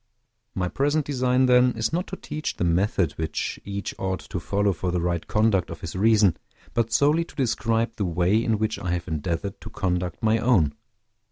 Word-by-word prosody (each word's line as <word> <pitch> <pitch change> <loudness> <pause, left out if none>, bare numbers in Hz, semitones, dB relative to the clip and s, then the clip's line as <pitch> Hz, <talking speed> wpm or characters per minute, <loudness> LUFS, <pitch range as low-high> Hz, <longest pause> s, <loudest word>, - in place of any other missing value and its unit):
My 90 -1 0
present 145 - 0
design, 130 -2 +2
then, 125 0 +5
is 115 +6 -2
not 180 +3 -1
to 190 - -5
teach 155 -4 -5
the - - -2
method 90 -1 +1
which 80 -1 -3
each 100 0 -4
ought 95 -3 -2
to - - -2
follow 100 0 +1
for 90 +2 -3
the 90 0 0
right 85 -1 -1
conduct 105 -5 +2
of 85 - -8
his 80 - -6
reason, 105 -3 +4 0.4
but 115 -1 0
solely 150 +6 +3
to 165 - -16
describe 115 -2 0
the 100 - 0
way 90 +6 +2
in 115 -2 +1
which 110 +1 -1
I 90 -2 -2
have 85 0 -3
endeavored 85 +5 -3
to - - -8
conduct 90 -1 -2
my 110 +1 +3
own. 105 - +3
100 Hz, 195 wpm, -25 LUFS, 90-120 Hz, 0.4 s, then